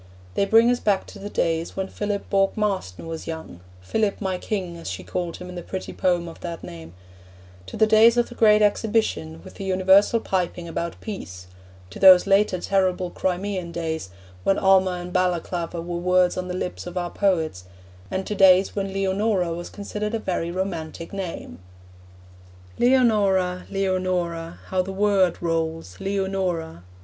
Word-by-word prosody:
They 200 - +1
bring 225 +4 +5
us 245 - 0
back 200 -2 +1
to 205 - -11
the 205 +1 -6
days 165 -3 -1
when 190 0 -1
Philip 205 0 -3
Bourke 195 +1 +2
Marston 190 - -2
was 165 -1 -6
young 160 - -7 0.2
'Philip, 210 - 0
my 190 -3 -2
King,' 185 -5 -3
as 170 - -7
she - - -5
called 175 -2 -4
him 180 - -9
in 180 - -8
the 175 - -6
pretty 190 +2 -6
poem 175 -2 0
of 165 - -10
that 170 -2 -6
name; 85 0 -10 0.7
to - - -7
the 220 - +5
days 220 +2 +6
of 240 - +3
the - - -11
Great 215 -2 +5
Exhibition, 205 - 0
with - - -12
the - - -8
universal 190 +4 +4
piping 180 -4 -2
about 170 +1 -4
peace; 95 - -7 0.5
to - - -9
those 185 -2 +8
later 195 -1 +3
terrible 185 -1 0
Crimean 185 -1 -2
days, 160 - -4 0.3
when 195 - +2
Alma 190 -1 +4
and 180 0 -6
Balaclava 175 -1 -1
were 175 0 -4
words 180 0 +3
on 185 0 -3
the 180 - -4
lips 180 -1 -4
of 175 +1 -6
our 175 -1 -2
poets; 160 - 0 0.4
and 190 0 -3
to - - -3
days 190 -1 +5
when 195 -1 -2
Leonora 195 -2 0
was 175 +1 -6
considered 210 +1 -4
a - - +1
very 175 -4 -2
romantic 170 -2 -4
name. 175 - -6 1.2
Leonora, 205 -8 +3
Leonora, 185 -4 -2
How 185 -1 +1
the 190 +1 -5
word 195 -2 +2
rolls 160 - -2
Leonora. 190 - -2
185 Hz, 170 wpm, -24 LUFS, 170-200 Hz, 1.2 s, those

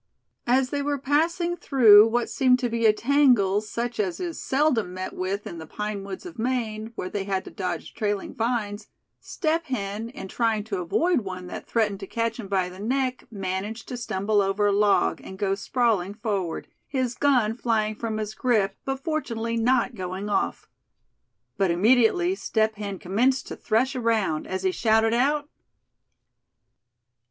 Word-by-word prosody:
As 255 +1 +2
they 285 - -1
were 285 0 -1
passing 335 +6 +1
through 225 -10 +7
what 235 +1 0
seemed 255 -3 +3
to 245 -1 -1
be 230 -1 +2
a - - +7
tangle 230 -5 +3
such 235 +2 -4
as 190 -4 -1
is 345 -2 -4
seldom 260 -10 +1
met 185 0 -5
with 195 +2 -3
in 170 - -7
the 160 - -9
pine 210 +2 -4
woods 195 - -7
of 335 -9 -9
Maine, 225 -3 -2
where 185 - -4
they 195 +1 -3
had 195 -1 -2
to - - -9
dodge 180 -3 -4
trailing 205 -3 -2
vines, 220 -4 -2 0.3
Step 325 -1 -1
Hen, 215 -3 -3
in 250 -6 -8
trying 225 0 0
to 205 -3 -3
avoid 330 - +2
one 185 -2 -6
that 180 - -8
threatened 210 -4 0
to 195 - -7
catch 230 +2 -2
him 215 - -6
by 190 -2 +1
the 180 +1 -11
neck, 255 +4 -1
managed 200 +2 -4
to 250 - -4
stumble 210 -3 0
over 195 +1 +1
a 205 - +4
log, 205 0 +2
and 190 - -9
go 195 -1 0
sprawling 205 -2 0
forward, 200 -6 -3 0.2
his 260 -3 -1
gun 250 -5 +2
flying 225 -2 0
from 220 0 -4
his 215 0 -3
grip, 210 -6 +1
but 270 0 -4
fortunately 230 -8 -2
not 240 +2 +2
going 190 0 -5
off. - - -1 0.9
But 195 -2 +2
immediately 245 - +3
Step 220 - 0
Hen 205 -2 -5
commenced 240 +10 +1
to - - -5
thresh 255 +5 0
around, 225 -10 0
as 190 0 -3
he 190 - +2
shouted 225 +2 +2
out: 285 +5 +2
"Thad! 295 - -32
220 Hz, 175 wpm, -25 LUFS, 200-250 Hz, 0.9 s, through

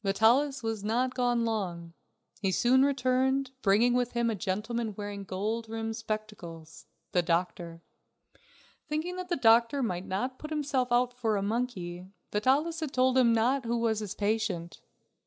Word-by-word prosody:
Vitalis 240 +7 +3
was 225 -2 -3
not 245 +4 0
gone 245 -2 +1
long. 175 -7 -3 0.5
He 195 -2 +1
soon 250 +7 +4
returned, 265 0 +1
bringing 220 +5 +4
with 245 -1 0
him 235 -1 +1
a - - -2
gentleman 215 +3 -2
wearing 205 -1 -5
gold 215 +4 -3
rimmed 225 0 -3
spectacles 210 -8 -7 0.2
the 180 - +3
doctor. 170 0 -2 1.0
Thinking 315 +4 -2
that 365 0 -6
the 350 - +1
doctor 235 +2 +4
might 180 -5 -3
not 250 +8 -3
put 305 - -7
himself 280 -5 -1
out 245 0 +3
for 225 -4 0
a 195 - -1
monkey, 195 -6 -3 0.2
Vitalis 280 +10 +1
had 315 -3 -2
not - - -25
told 255 0 +3
him 235 -3 +5 0.2
who 235 -1 -1
was 225 -2 +1
his 210 -3 -5
patient. 205 -5 -2
225 Hz, 155 wpm, -29 LUFS, 200-255 Hz, 1.0 s, him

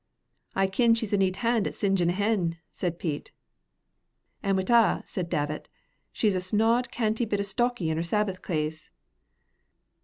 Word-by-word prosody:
"I 195 - +3
kin 230 +4 +3
she's 225 -2 -2
a - - +4
neat 190 -1 +2
han' 230 -3 +2
at - - -6
singein' 195 -4 +1
a - - +1
hen," 195 -4 0
said 175 -2 -3
Pete. 155 -5 -4 1.1
"An' 195 0 +1
wi't 190 +4 0
a'," 230 -4 +4
said 180 -3 -4
Davit, 150 0 -2 0.4
"she's 210 -3 +1
a 185 - -1
snod, 225 +6 +2
canty 225 0 0
bit 205 -3 -1
stocky 240 -4 0
in 160 - -1
her 165 - 0
Sabbath 190 +1 -1
claes." 155 -2 -3
195 Hz, 160 wpm, -27 LUFS, 175-225 Hz, 1.1 s, a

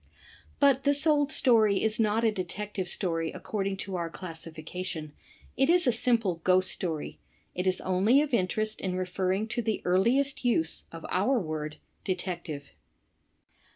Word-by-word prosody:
But 275 -2 +4
this 285 +1 +2
old 295 -2 +3
story 220 -9 +4
is 220 0 0
not 220 +1 +2
a 225 - +4
Detective 195 0 -4
Story 165 -3 0
according 195 -2 -3
to 195 - -5
our 170 -1 -3
classification, 165 -1 -7 0.4
it 270 +3 +2
is 350 -1 +5
a 250 - +4
simple 225 -7 +1
Ghost 185 0 +3
Story. 160 -5 -4 0.3
It 180 +1 -2
is 185 0 +2
only 195 +8 +3
of 290 -3 -6
in 190 -6 +3
terest 215 +3 -2
in 185 -1 -2
referring 185 +3 -1
to 235 +2 -1
the 220 -2 -1
earliest 240 +11 +2
use 170 -10 0
of 165 0 -9
our 210 +9 +2
word 155 -4 -4 0.3
''detective." 175 -5 -4
195 Hz, 155 wpm, -28 LUFS, 180-230 Hz, 0.4 s, is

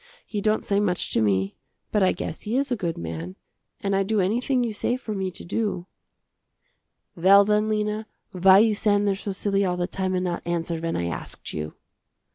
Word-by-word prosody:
He 210 -2 -3
don't 215 +1 +1
say 200 0 +2
much 185 -4 0
to - - +2
me, 95 -2 +1 0.3
but 210 - +2
I 190 - +5
guess 160 - -5
he 225 +4 -1
is 275 -1 0
a - - +3
good 175 -6 -3
man, 85 +2 -5 0.5
and 195 -1 0
I 195 - +3
do 210 +2 +1
anything 245 +7 +1
you 230 -2 -2
say 240 +4 -1
for 220 -4 -5
me 190 -2 -2
to 180 - -10
do." 190 -2 -2 1.3
"Well 195 +4 +6
then 210 +1 +2
Lena, 215 0 -1 0.2
why 190 0 +6
you 220 +1 +5
stand 205 -1 +2
there 200 - +3
so 195 +1 -4
silly 200 +1 0
all 180 -2 0
the 175 - 0
time 185 0 -2
and 180 - 0
not 175 -1 -2
answer 170 -1 -2
when 165 0 -2
I 85 - -1
asked 85 - -6
you." 75 0 -5
195 Hz, 210 wpm, -25 LUFS, 175-210 Hz, 1.3 s, Well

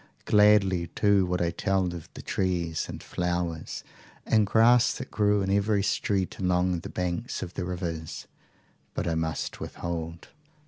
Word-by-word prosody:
Gladly 105 -4 +4
too 100 +1 +2
would 90 0 0
I 85 - 0
tell 95 +2 0
of 85 -3 -8
the - - -8
trees 85 -4 -1
and - - -7
flowers 85 -2 -3 0.4
and 110 -2 +3
grass 115 +3 +5
that 130 - -7
grew 105 -1 +2
in 95 - -1
every 100 0 +2
street 100 -1 -1
along 90 -1 +1
the - - -8
banks 90 +7 -3
of 90 - -7
the 90 - -3
rivers. 85 -3 -4 0.7
But - - -2
I 85 - +1
must 80 -1 -2
withhold. 85 -1 -5
90 Hz, 150 wpm, -27 LUFS, 85-100 Hz, 0.7 s, grass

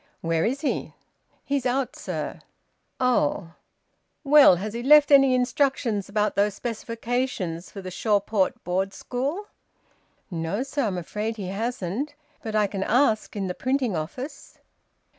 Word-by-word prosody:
"Where 165 -1 +1
is 265 +5 -1
he?" 295 - -2 0.5
"He's 280 -2 0
out, 255 +1 -1
sir." - - -5 0.6
"Oh! 175 - +1 0.7
Well! 285 - +7
Has 205 +4 -5
he 235 - -4
left 295 +2 +6
any 275 -2 +7
instructions 250 -5 0
about 210 0 0
those 205 0 +2
specifications 230 -6 -3
for 195 - -9
the 185 - -6
Shawport 205 0 0
Board 190 +2 -1
School?" 280 - -3 0.9
"No, 170 +7 -2
sir. 275 -1 -2
I'm 195 -4 -2
afraid 210 +6 -4
he 190 -3 -5
hasn't. 230 - -3 0.3
But 220 -1 -5
I 210 -1 +4
can 195 -1 -4
ask 225 0 +2
in 200 -2 -2
the 180 - -2
printing 255 -2 0
office." 175 - -6
220 Hz, 140 wpm, -25 LUFS, 195-260 Hz, 0.9 s, Well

